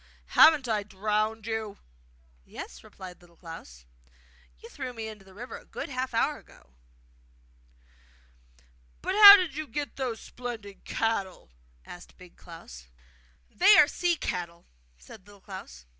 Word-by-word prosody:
'Haven't 305 -5 +6
I 215 -2 0
drowned 215 +2 -2
you?' 220 -2 -4 0.7
'Yes,' - - -10
replied 180 -1 -12
Little 170 -1 -21
Klaus; 60 - -12 0.7
'you - - -13
threw 260 -2 -7
me 225 -2 -6
into 215 -2 -10
the 190 -1 -18
river 245 +4 -8
a - - -19
good - - -7
half 255 -2 -4
hour 290 +6 0
ago!' - - -22 2.3
'But 375 - -1
how 405 0 +12
did 365 -7 -1
you 310 0 -5
get 290 +4 -5
those 250 -4 -3
splendid 225 -5 -9
cattle?' 195 - -3 0.3
asked 175 0 -13
Big 180 -1 -16
Klaus. 60 - -13 0.6
'They 400 +4 +6
are 295 - +7
sea 345 +2 0
cattle!' 170 - -5 0.3
said 185 - -15
Little 205 -1 -17
Klaus. 65 - -11
215 Hz, 140 wpm, -27 LUFS, 180-255 Hz, 2.3 s, how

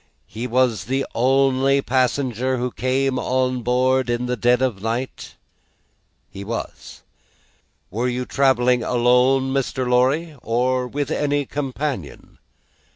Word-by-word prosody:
He 115 +3 -6
was 120 -6 +1
the 135 +3 -1
only 135 +2 +2
passenger 130 -1 0
who 125 +1 -2
came 130 +1 0
on 130 0 0
board 125 +1 +1
in 120 +1 -1
the 125 0 -1
dead 120 +1 +2
of 130 -6 0
the - - -17
night?" 115 +4 -4 1.0
"He 100 - -8
was." 115 +3 -7 0.9
"Were 115 +6 -1
you 125 0 -2
travelling 125 -3 +2
alone, 125 +3 +2
Mr. 130 -1 -1
Lorry, 135 +6 +1
or 125 +2 0
with 140 +2 -3
any 145 -1 0
companion?" 135 - -5
130 Hz, 125 wpm, -21 LUFS, 125-135 Hz, 1.0 s, only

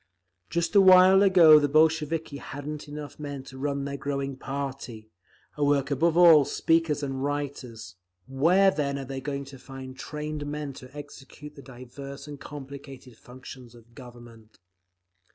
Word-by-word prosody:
Just 170 -1 -2
a 205 - +6
little 190 -1 +8
while 190 +1 +6
ago 175 -6 +7
the 145 -1 0
Bolsheviki 155 0 +1
hadn't 145 +2 -8
enough 145 0 -9
men 145 -2 -6
to 130 0 -12
run 140 0 -2
their 140 0 -5
growing 140 -1 -4
party—a 130 -4 -8
work 145 -1 +1
above 165 +4 +1
all 170 -4 +8
of 140 - -3
speakers 165 -3 0
and 135 -1 -4
writers; 130 -9 -5 0.3
where 175 +9 +3
then 140 -3 -2
are 135 - -6
they 135 +1 -6
going 140 0 -5
to 135 -1 -13
find 130 0 -10
trained 150 -1 -6
men 145 -1 -5
to 130 -1 -12
execute 145 0 -11
the 140 - -12
diverse 135 +2 -11
and 145 -1 -9
complicated 135 -3 -11
functions 125 0 -13
of 115 0 -19
government? 120 -3 -15
140 Hz, 155 wpm, -26 LUFS, 130-150 Hz, 0.3 s, little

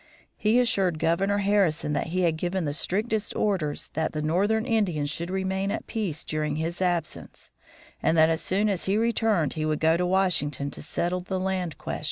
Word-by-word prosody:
He 220 +3 +3
assured 195 -8 +2
Governor 170 +6 +1
Harrison 195 -7 +2
that 150 - -1
he 180 +3 -1
had 170 -3 +2
given 175 +2 -2
the 145 - -1
strictest 210 +6 -1
orders 180 -8 -1
that 160 +1 -2
the 155 - -2
northern 205 +8 +1
Indians 180 - 0
should 170 +3 -4
remain 190 +1 -1
at 215 - -3
peace 195 -10 -3
during 155 -1 -2
his 165 +3 -3
absence, 175 -4 -3 0.5
and 165 - +2
that 160 0 +7
as 160 0 0
soon 200 +3 +1
as 195 -4 -1
he 195 +2 +2
returned 220 - +1
he 155 - -3
would 155 -1 0
go 160 +1 +3
to 180 - 0
Washington 150 -7 0
to - - -9
settle 175 +4 -1
the 185 +1 -3
land 185 -3 -2
question. - - -4
180 Hz, 195 wpm, -26 LUFS, 160-200 Hz, 0.5 s, that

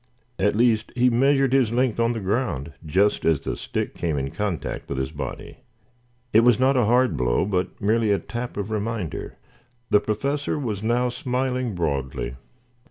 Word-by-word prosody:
At 105 +2 +2
least, 115 -1 +2
he 125 0 +4
measured 135 +2 +3
his 130 -5 +3
length 125 -1 +1
on 115 +1 +2
the 115 - -3
ground 95 - -2
just 95 +7 +2
as 80 -4 +3
the - - -4
stick - - -3
came 80 -4 -2
in 70 0 -2
contact 105 -6 -3
with 70 - -3
his 65 +1 -2
body. 70 -5 -6 0.8
It 110 - +7
was 120 0 +4
not 135 +1 +4
a 125 -3 +3
hard 125 +3 +3
blow, - - +1
but 95 -2 -2
merely 110 +1 +2
a 100 - +3
tap 120 +2 -6
of 100 +1 -3
reminder. 110 -5 -3 0.5
The 105 - +6
Professor 140 +9 -1
was 110 -9 -3
now 120 +3 +1
smiling 125 -2 -2
broadly. 70 -7 -2
110 Hz, 170 wpm, -24 LUFS, 90-125 Hz, 0.8 s, It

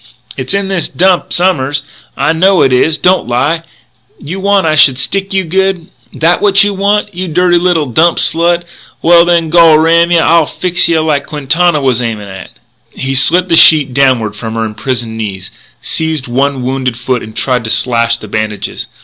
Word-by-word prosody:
It's - - -3
in 200 -1 -2
this 190 -5 -2
Dump 185 0 0
som'ers. 145 -6 0 0.3
I - - +1
know 185 +3 +2
it 130 - +1
is 150 +5 +1
don't 185 -5 +1
lie! 140 +7 -1 0.6
You 175 +7 -7
want 200 0 +1
that 160 - +1
I - - 0
should 135 -3 +4
stick 195 +8 -2
you 190 -1 0
good? 185 0 -2 0.2
That 170 +2 0
what 200 0 +4
you 205 0 -1
want 205 +1 -1
you 185 +1 -5
dirty 175 +1 +1
little 175 -3 0
dump 160 +7 +1
slut? 170 +1 0 0.4
Well, 170 0 +5
then, 170 -2 0
gol 165 -2 +5
ram 165 +2 +2
yeh 175 - +3
I'll 165 -2 +3
fix 180 -1 -1
yeh 165 -1 +1
like 145 -3 -1
Quintana 155 +3 0
was 130 -3 0
aimin' 110 -4 -5
at 95 0 -10 0.3
" - - -43
He 135 0 -5
slit 170 +7 +2
the 170 - +2
sheet 150 -5 +5
downward 125 -6 +1
from 110 +1 -7
her 115 0 -2
imprisoned 110 +1 -5
knees, 100 -4 -6 0.3
seized 160 -4 -2
one 135 +1 -1
wounded 130 -2 -3
foot 125 0 -2
and 110 0 -11
tried 125 -3 -1
to - - -4
slash 115 0 +1
the 110 - -11
bandages. 110 0 -4
155 Hz, 190 wpm, -11 LUFS, 125-175 Hz, 0.6 s, Well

